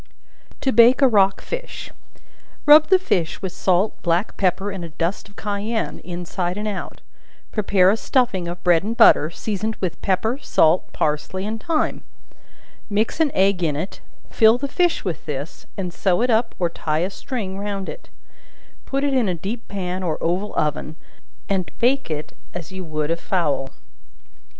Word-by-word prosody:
To 265 - +1
Bake 240 +4 +6
a - - +8
Rock 195 -5 +3
Fish. - - -6 0.7
Rub 300 +1 +8
the 380 - +6
fish 180 - -1
with 190 - -2
salt, 185 +4 +1
black 175 +4 0
pepper, 190 +1 0
and 190 -3 -6
a 170 - -6
dust 170 +6 -3
of 205 - -20
cayenne, 210 +2 -3
inside 175 +1 -4
and 210 +1 -3
out; 200 -3 -5 0.5
prepare 195 -3 +3
a - - +2
stuffing 225 -9 +1
of 175 +1 -6
bread 175 -2 +4
and 225 +4 -4
butter, 155 - +6
seasoned 215 +4 -3
with 185 -3 -4
pepper, 220 +7 0
salt, 165 - +2
parsley 155 +6 -2
and 220 +1 -4
thyme; 325 -2 0 0.9
mix 215 +7 0
an 320 -2 +4
egg 190 -1 +3
in 155 -4 +1
it, 165 +7 -5 0.3
fill 225 0 +5
the 280 +3 -3
fish 350 +1 +1
with 175 -4 -4
this, 145 +3 -6
and 180 -3 -3
sew 190 +4 +1
it 250 - +2
up 225 +1 +1
or 175 - +1
tie 160 0 -1
a - - -3
string 195 -4 -5
round 200 -1 -3
it; - - -9 0.8
put 275 +1 -1
it 285 -1 +1
in 245 -6 +2
a 180 - 0
deep 210 +8 -5
pan, 185 -2 -4
or 165 -4 -1
oval 185 +5 -1
oven 150 +1 -1 0.5
and 190 -3 -1
bake 265 0 +1
it 155 -1 -5 0.2
as 175 0 -6
you 190 0 -6
would 155 -2 -2
a - - +2
fowl. 165 -7 -1
195 Hz, 175 wpm, -22 LUFS, 175-225 Hz, 0.9 s, a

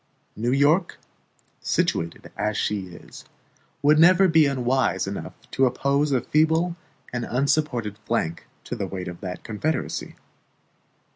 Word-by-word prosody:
New 120 +3 -1
York, 145 +7 +3 0.6
situated 85 0 -1
as 105 0 -1
she 100 -3 -1
is, 85 -1 -12 0.6
would 150 +2 +5
never 185 +3 +7
be 160 -3 +5
unwise 130 -1 +1
enough - - -6 0.2
to 135 0 +3
oppose 140 +3 +1
a 130 -3 +2
feeble 160 +3 +2 0.4
and 120 -1 -2
unsupported 125 -5 0
flank 85 -7 -2 0.2
to - - -5
the - - -3
weight 95 -2 -5
of 90 -1 -8
that 90 -1 -6
confederacy. 135 +9 -3
130 Hz, 130 wpm, -24 LUFS, 105-155 Hz, 0.6 s, never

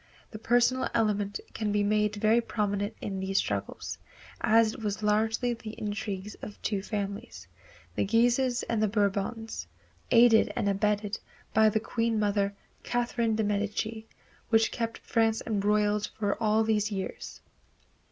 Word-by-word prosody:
The 215 - -8
personal 245 +3 +2
element 205 -3 +1
can 215 -2 -2
be 205 0 +2
made 210 0 +1
very 215 +3 +3
prominent 205 -2 -2
in 195 -2 -3
these 190 +1 -1
struggles, 100 - -2 0.4
as 225 0 +4
it - - -9
was 210 0 -3
largely 220 +3 +1
the 225 -2 -8
intrigues 205 -1 -4
of 205 - -8
two 200 -3 -1
families, 200 -1 -5 0.5
the - - 0
Guises 240 +4 +2
and 230 -2 -1
the 215 - +3
Bourbons, 210 +2 -1 0.4
aided 230 -1 +6
and - - 0
abetted 205 +1 0 0.3
by 220 0 +6
the 220 - +1
Queen 230 0 -1
Mother, 200 -1 +1 0.3
Catherine 235 -2 0
de 220 - +1
Medici, 210 +2 -2 0.4
which 225 -1 +4
kept 230 -1 -3
France 225 -1 +1
embroiled 210 0 +1
for 205 -2 0
all 220 0 +3
these 215 -1 +1
years. 195 -2 -5
215 Hz, 140 wpm, -29 LUFS, 205-225 Hz, 0.5 s, aided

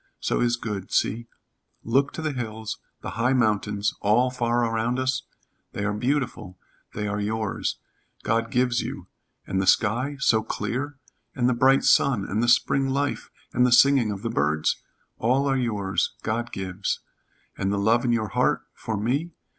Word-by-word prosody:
So - - 0
is 120 0 +2
good. 105 -5 -5
See. 115 +2 0 0.6
Look 135 +5 +2
to 160 - -5
the 155 - 0
hills, 110 -4 -5 0.2
the - - -5
high 120 +3 +1
mountains, 105 -4 +1
all 120 +5 +3
far 120 -1 +1
around 115 +2 0
us? 130 0 -1 0.5
They 100 - -3
are 105 - 0
beautiful. 125 -5 -2 0.4
They 105 0 -2
are 100 0 -2
yours. 110 0 -2 0.5
God 115 0 0
gives 125 0 +1
you. - - -6 0.4
And 95 - -1
the 95 - -2
sky 120 +8 +2
so 110 -5 +3
clear 125 +7 -3 0.4
and 125 -2 +2
the 125 - +3
bright 130 +3 +4
sun 125 -8 +3
and 105 +3 -1
the 120 - +1
spring 135 +3 +3
life 140 +1 -1 0.2
and 125 - +3
the 125 - +4
singing 130 -1 +5
of 100 -1 -5
the 115 - -2
birds? 75 +2 +1 0.4
All 130 +5 +2
are 135 - +2
yours 100 -8 -1
God 115 +2 -2
gives. 95 0 -3 0.5
And 95 - -1
the 100 - 0
love 110 +4 +3
in 120 - +1
your 110 -3 0
heart - - +1
for 110 -2 -4
me? 140 +11 -1
115 Hz, 170 wpm, -25 LUFS, 105-130 Hz, 0.6 s, singing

